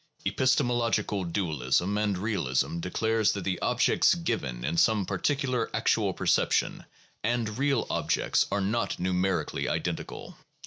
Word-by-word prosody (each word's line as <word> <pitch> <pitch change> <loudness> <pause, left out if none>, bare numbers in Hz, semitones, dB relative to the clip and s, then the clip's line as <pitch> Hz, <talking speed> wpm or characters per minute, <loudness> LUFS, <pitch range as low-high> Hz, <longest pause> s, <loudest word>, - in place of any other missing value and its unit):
Epistemological 120 -6 +1
dualism 85 0 0
and 105 -2 0
realism 85 - -1
declares 110 +5 +1
that 100 - -4
the 90 -1 -2
objects 125 +6 +3
given 65 - -3
in 80 - -1
some 105 +3 +3
particular 125 +5 -1
actual - - +1
perception - - +1 0.4
and 115 0 -1
real 140 -3 +1
objects - - +1
are 100 - 0
not 110 +4 -1
numerically 95 +1 -1
identical. - - -4
105 Hz, 120 wpm, -28 LUFS, 90-120 Hz, 0.4 s, objects